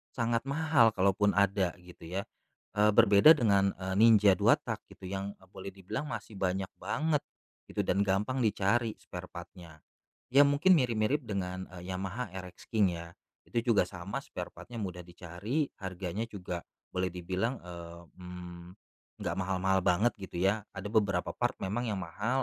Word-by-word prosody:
sangat 115 -1 0
mahal 140 -6 +4
kalaupun 100 +2 +3
ada, 100 -3 +2
gitu 90 -2 -12
ya. 100 - -1 0.5
Eee, 105 +1 +5
berbeda 115 +7 +8
dengan, 100 -7 +3
eee, 95 0 -4
Ninja 105 -3 +7
2 - - +6
tak - - -4
gitu, - - -17
yang 100 +1 -4 0.2
boleh 95 +1 -7
dibilang 100 +9 -5
masih 110 -4 -6
banyak 95 0 -1
banget, 150 - 0 0.4
itu - - -2
dan 100 +2 +2
gampang 105 +7 +1
dicari 110 +1 +1
sparepart-nya. 80 -3 -10 0.4
Ya 140 +3 +6
mungkin 145 +6 +5
mirip-mirip 125 -1 +2
dengan, 95 -4 -3
eee, 90 - -9
Yamaha 95 +5 -4
RX 90 -1 -9
King 100 -6 +2
ya, 85 - -7 0.4
itu 120 +1 -1
juga 100 -5 +4
sama 90 +1 -5
sparepart-nya 120 -1 -8
mudah 90 -2 -5
dicari, 90 - -3
harganya 95 +3 -4
juga 90 -5 -6 0.2
boleh 90 0 -1
dibilang, 95 +8 -2
eee, 85 -1 -9 0.2
mmm, 90 -1 -9 0.6
enggak - - -2
mahal-mahal 95 0 +1
banget 95 +7 +3
gitu 95 -2 -7
ya. 100 +2 +1
Ada 95 +1 -5
beberapa 100 -5 +1
part - - 0
memang 115 +6 -1
yang 105 -3 -1
mahal, 125 +8 -1
100 Hz, 155 wpm, -31 LUFS, 90-115 Hz, 0.6 s, berbeda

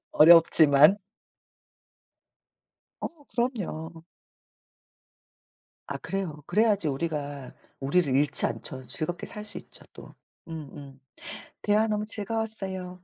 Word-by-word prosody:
어렵지만. 160 +1 +7 2.0
어 315 -3 -7
그럼요. 170 -10 -4 1.8
아 - - -3
그래요. 175 -7 -5
그래야지 205 -3 +2
우리가 145 -2 -4 0.3
우리를 140 0 +1
잃지 140 +1 +2
않죠. 130 0 -5
즐겁게 155 +8 -4
살 210 0 -8
수 205 - -7
있죠. - - -11
또 - - -13 0.3
음음 140 -4 -9 0.6
대화 210 +1 +2
너무 210 -1 -1
즐거웠어요. 210 -4 -4
170 Hz, 205 characters per minute, -27 LUFS, 145-210 Hz, 2.0 s, 어렵지만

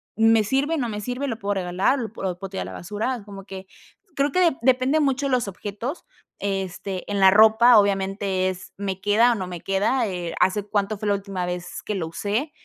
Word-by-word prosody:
¿me 225 -1 +4
sirve, 275 +8 0
no 245 -5 -1
me 210 -1 -4
sirve, 250 +6 -3
lo 230 -4 -4
puedo 205 -2 -1
regalar, 185 +8 +1
lo 225 -4 -5
p - - -12
o - - -6
lo 180 -2 -2
puedo 195 0 -7
tirar 190 - -4
a - - -8
la - - -7
basura? 215 +5 -3
Como 195 -2 -10
que 190 -1 -8 0.5
creo 280 0 +1
que 365 - +1
de 270 - -10
depende 260 +4 +3
mucho 280 -1 +1
de 275 - -1
los 245 -4 +1
objetos. 210 - -6 0.3
Este, 195 -1 -4
en 200 - 0
la 190 -1 +7
ropa 220 +3 +7
obviamente 195 -1 0
es, 185 0 -8
¿me 195 -1 -3
queda 220 +5 +4
o - - +1
no 185 -3 -4
me 175 -2 -7
queda?, 205 +6 +1
eh, 180 -3 -4
¿hace 200 +2 +2
cuánto 205 0 -1
fue 215 - -3
la 205 - +3
última 195 -2 -4
vez 180 0 -5
que 210 - -3
lo 170 -4 -2
usé? 210 - -2
205 Hz, 235 wpm, -23 LUFS, 190-240 Hz, 0.5 s, la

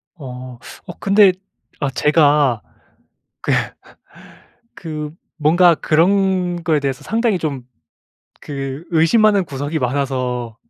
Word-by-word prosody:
어. 125 -5 -9 0.3
어 - - -8
근데 200 -1 +5 0.5
아 145 - -1
제가 145 -4 +2 0.8
그 - - -1 1.3
그 155 -3 -5 0.3
뭔가 170 +3 +5
그런 180 +2 +1
거에 160 -2 +1
대해서 135 -1 -3
상당히 225 -2 0
좀 140 -7 -4 0.7
그 135 +1 -6
의심하는 200 +5 +4
구석이 145 +3 -3
많아서 125 -3 -2
150 Hz, 185 characters per minute, -18 LUFS, 135-180 Hz, 1.3 s, 근데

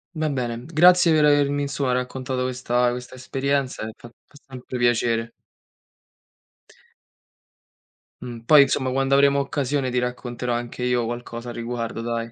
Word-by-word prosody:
va 155 -1 -1
bene, 120 -3 -3
grazie 175 +2 +5
per 155 -1 +4
avermi, 145 -1 +3
insomma, 140 -2 -1
raccontato 125 +1 -3
questa 125 -1 0
questa 125 +1 -7
esperienza, 135 +1 -2
ehm, 110 - -5
fa 120 - -13
fa 130 - -29
sempre 130 -1 -7
piacere. 115 -1 +1 2.9
Mh. 120 -2 -7
Poi 150 +1 +8
insomma 130 -1 +1
quando 135 +1 +1
avremo 140 0 +4
occasione 140 -1 -1
ti 125 - -2
racconterò 125 0 -3
anche 120 +1 -4
io 125 -1 +1
qualcosa 120 0 -6
a - - -4
riguardo, 115 -1 -4
dai. 115 0 -3
125 Hz, 140 wpm, -23 LUFS, 120-140 Hz, 2.9 s, Poi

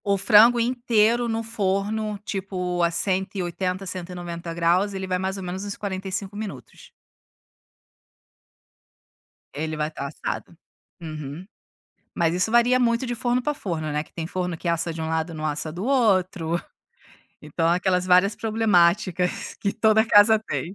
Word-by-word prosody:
O 200 -1 +2
frango 225 +4 +6
inteiro 235 -1 +2
no 225 0 -1
forno, 210 0 -1
tipo, 180 -3 -3
a 170 - +3
180, 185 +1 -2
190 175 -2 -6
graus, 175 +4 +1
ele 190 0 -3
vai 185 -1 -1
mais 190 +1 -2
ou 195 - -6
menos 180 +2 -5
uns 205 0 -5
45 195 0 -4
minutos. 195 - -8 2.6
Ele 155 +2 -3
vai 150 +1 -2
tá 140 -2 -5
assado. 155 +3 -6 0.5
Uhum. 155 +1 -7 0.7
Mas 165 -1 +1
isso 185 +5 0
varia 240 +2 +4
muito 235 0 +1
de 240 -1 -3
forno 245 +1 0
pra 295 +4 -1
forno, 165 - -4
né, 150 +1 -1
que - - -25
tem 165 -1 -4
forno 180 -1 -3
que 175 - -6
assa 170 0 0
de 160 - -6
um 160 - -3
lado, 160 +1 -2
não 155 -1 -5
assa 155 +1 -2
do 180 +6 -5
outro. 185 -10 +1 0.8
Então, 165 +2 -1
aquelas 180 +1 +1
várias 185 +3 +4
problemáticas 185 -5 +1
que 200 - 0
toda 220 0 +3
casa 220 +1 +6
tem. 180 - -3
185 Hz, 150 wpm, -24 LUFS, 170-215 Hz, 2.6 s, frango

